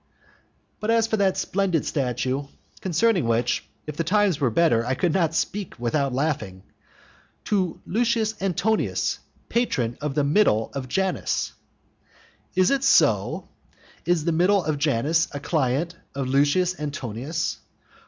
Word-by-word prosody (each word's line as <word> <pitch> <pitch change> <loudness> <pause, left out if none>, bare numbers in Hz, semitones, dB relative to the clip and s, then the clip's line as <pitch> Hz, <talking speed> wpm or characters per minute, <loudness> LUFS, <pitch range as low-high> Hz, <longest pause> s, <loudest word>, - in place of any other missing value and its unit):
But 215 - -3
as 230 -1 +4
for 225 -1 -1
that 195 -2 +2
splendid 185 -5 0
statue, 130 0 -1 0.4
concerning 190 - +2
which, 115 +1 0 0.2
if 150 - -6
the 165 - 0
times 195 -1 +2
were 135 -4 +2
better, 115 -3 +3
I 125 +2 -1
could 170 +3 +1
not 165 -4 +1
speak 200 +2 -2
without 135 +3 0
laughing, 125 -9 -2 0.8
"To 190 -5 0
Lucius 225 0 +1
Antonius, 195 +3 0 0.3
patron 130 - -1
of 145 -2 -3
the 145 - +2
middle 140 - +2
of 135 -2 -4
Janus" 190 +8 -1 1.0
Is 185 +4 +4
it 275 -1 +1
so? - - +3 0.5
Is 175 -3 +1
the 170 - +2
middle 180 +4 +3
of 155 -2 -1
Janus 150 +3 +2
a - - -3
client 150 +2 0 0.2
of 135 -1 -2
Lucius 145 +7 +2
Antonius? 145 +1 -3
160 Hz, 135 wpm, -24 LUFS, 135-190 Hz, 1.0 s, as